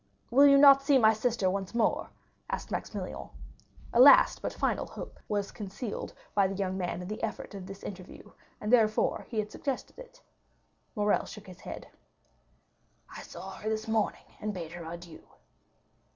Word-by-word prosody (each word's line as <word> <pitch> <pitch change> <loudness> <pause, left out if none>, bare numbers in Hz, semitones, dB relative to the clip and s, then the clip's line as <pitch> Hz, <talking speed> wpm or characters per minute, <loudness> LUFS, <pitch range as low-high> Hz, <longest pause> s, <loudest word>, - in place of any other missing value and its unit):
"Will 280 +4 +7
you 280 0 +7
not 275 -1 +8
see 275 0 +4
my 220 -3 +6
sister 220 -3 0
once 195 +3 -2
more?" 235 - +1 0.4
asked - - -4
Maximilian. - - -5 0.6
A 235 - +3
last 275 +3 +8
but - - -3
final - - -1
hope - - -9
was 205 -2 -2
concealed 210 +2 -6 0.2
by 200 -2 +3
the 195 - -4
young 190 -1 -2
man 180 -1 -3
in - - -7
the 215 +2 -5
effect 220 -2 -4
of 190 -2 -8
this 195 0 -10
interview, 185 -2 -9 0.3
and 210 +3 -2
therefore 215 -3 +3
he 230 - -5
had 210 0 -1
suggested 275 -3 -5
it. - - -13 0.8
Morrel 210 -1 +1
shook 210 -1 -10
his 185 0 -12
head. - - -8 1.3
"I - - -7
saw - - -9
her 215 - -5
this 220 +1 -2
morning, 220 -1 0
and 210 -1 -3
bade 165 -3 -6
her 175 0 -8
adieu." 170 -1 -10
210 Hz, 170 wpm, -29 LUFS, 190-240 Hz, 1.3 s, not